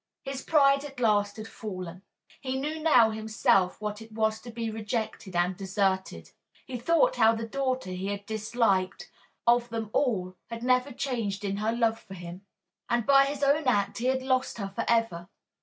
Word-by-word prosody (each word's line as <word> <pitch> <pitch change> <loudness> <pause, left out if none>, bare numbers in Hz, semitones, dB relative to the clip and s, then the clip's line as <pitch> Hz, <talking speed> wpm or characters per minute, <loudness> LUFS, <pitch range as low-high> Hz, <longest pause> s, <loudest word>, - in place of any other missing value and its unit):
His 270 -1 -5
pride 275 -3 +4
at 275 -3 -9
last 205 -3 +2
had 215 0 -7
fallen. 185 -5 -7 0.4
He 265 0 -2
knew 305 +3 -3
now 250 -8 +5
himself 215 -4 +1
what 210 0 -4
it 225 0 -12
was 220 0 0
to 240 - -10
be 230 -1 -4
rejected 215 -3 -4
and 175 +1 +1
deserted. 190 0 -1 0.3
He 250 -2 -5
thought 335 - +3
how 225 +1 +5
the 225 0 -4
daughter 260 -4 -2
he 185 +1 -4
had 200 0 -4
disliked, 215 -3 0 0.3
of 240 0 +4
them 225 -2 -4
all, 185 -9 0
had 230 0 -6
never 255 +2 +2
changed 225 -6 -3
in 200 0 -1
her 215 +2 0
love 230 -1 +1
for 195 -2 -11
him. 175 +1 -9 0.5
And 240 -2 +1
by 275 -1 +6
his 285 0 -3
own 285 +1 +3
act 205 -4 +1
he 240 - -3
had 260 0 +1
lost 260 -1 0
her 200 -3 -4
for 230 - -2
ever. 225 -7 +1
225 Hz, 185 wpm, -28 LUFS, 200-255 Hz, 0.5 s, by